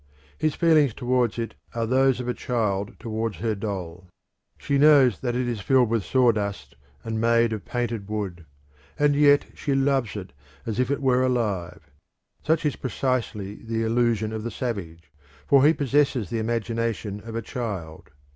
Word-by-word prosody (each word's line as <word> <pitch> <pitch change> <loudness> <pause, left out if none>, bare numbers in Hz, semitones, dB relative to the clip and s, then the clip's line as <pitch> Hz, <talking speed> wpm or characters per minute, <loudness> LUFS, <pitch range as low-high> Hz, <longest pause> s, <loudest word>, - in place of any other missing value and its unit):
His 155 -1 -1
feelings 155 -8 +3
towards 125 -3 0
it 115 -1 -3 0.2
are 115 -1 0
those 130 +2 +3
of 125 - -4
a 125 - 0
child 105 -6 -2
towards 110 -3 -3
her 110 +5 -1
doll. 95 -4 -5 0.5
She 140 -1 0
knows 140 -7 +6
that 120 -2 -2
it 125 0 0
is 115 -4 -3
filled 125 +1 +3
with 115 -3 0
sawdust 110 -6 0 0.3
and 110 -1 -3
made 115 0 +3
of 105 -4 -6
painted 115 -4 -3
wood, 95 -6 -4 0.5
and 145 -1 +3
yet 145 0 +5
she 140 -2 -2
loves 135 -5 +1
it 95 -3 -7 0.3
as 110 -1 -3
if 130 - +1
it 140 0 -1
were 130 -1 +3
alive. 95 - -2 0.5
Such 160 +1 +1
is 150 - +1
precisely 120 -6 -2
the 115 0 -2
illusion 115 -1 +1
of 110 - -3
the 120 - -4
savage, 85 - -5 0.3
for 140 -1 +5
he 150 - +7
possesses 140 -6 +1
the 115 - -1
imagination 115 -2 -2
of 115 0 -8
a 115 - -1
child. 100 -11 -6
115 Hz, 165 wpm, -25 LUFS, 105-130 Hz, 0.5 s, he